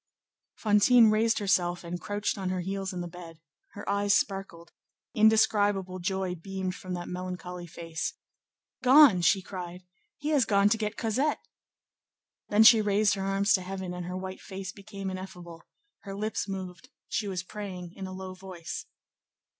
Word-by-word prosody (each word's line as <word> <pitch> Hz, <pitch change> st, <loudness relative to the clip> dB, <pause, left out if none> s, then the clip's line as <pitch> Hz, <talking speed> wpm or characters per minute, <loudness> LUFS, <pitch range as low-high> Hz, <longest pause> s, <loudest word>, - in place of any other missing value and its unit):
Fantine 220 Hz, +2 st, +5 dB
raised 225 Hz, +1 st, +2 dB
herself 180 Hz, -4 st, +1 dB
and 175 Hz, +1 st, -5 dB
crouched 205 Hz, 0 st, -2 dB
on 190 Hz, -3 st, -3 dB
her 185 Hz, -1 st, -1 dB
heels 195 Hz, +1 st, -3 dB
in 180 Hz, -2 st, -4 dB
the 175 Hz, -, -4 dB
bed: 170 Hz, -2 st, -11 dB, 0.3 s
her 205 Hz, -, -9 dB
eyes 200 Hz, 0 st, +2 dB
sparkled; 190 Hz, -4 st, -2 dB, 0.4 s
indescribable 205 Hz, -4 st, +3 dB
joy 190 Hz, 0 st, -1 dB
beamed 190 Hz, +1 st, -4 dB
from 185 Hz, 0 st, -6 dB
that 175 Hz, 0 st, -6 dB
melancholy 180 Hz, -1 st, -6 dB
face. 165 Hz, -1 st, -4 dB, 0.7 s
"Gone!" 260 Hz, -7 st, +7 dB
she 190 Hz, +3 st, +3 dB
cried; 180 Hz, -1 st, -7 dB, 0.3 s
"he 295 Hz, +1 st, -3 dB
has 285 Hz, -6 st, +3 dB
gone 200 Hz, -1 st, +4 dB
to 225 Hz, -, +2 dB
get 210 Hz, 0 st, -3 dB
Cosette." 260 Hz, +7 st, 0 dB, 1.0 s
Then 210 Hz, +2 st, +6 dB
she 220 Hz, 0 st, +8 dB
raised 205 Hz, 0 st, +3 dB
her 195 Hz, -, -3 dB
arms 195 Hz, +1 st, +2 dB
to 190 Hz, -, +3 dB
heaven, 185 Hz, -1 st, -5 dB
and 180 Hz, -1 st, -5 dB
her 180 Hz, +1 st, -4 dB
white 190 Hz, 0 st, -6 dB
face 190 Hz, -1 st, -6 dB
became 200 Hz, -2 st, -7 dB
ineffable; 180 Hz, -3 st, -9 dB, 0.3 s
her 195 Hz, -1 st, -8 dB
lips 215 Hz, +2 st, -2 dB
moved; 190 Hz, +4 st, -6 dB, 0.2 s
she 210 Hz, -, -2 dB
was 185 Hz, -2 st, -3 dB
praying 185 Hz, -3 st, -7 dB
in 190 Hz, -1 st, -7 dB
a -, -, -8 dB
low 185 Hz, 0 st, -7 dB
voice. 185 Hz, -3 st, -7 dB
190 Hz, 160 wpm, -28 LUFS, 180-205 Hz, 1.0 s, she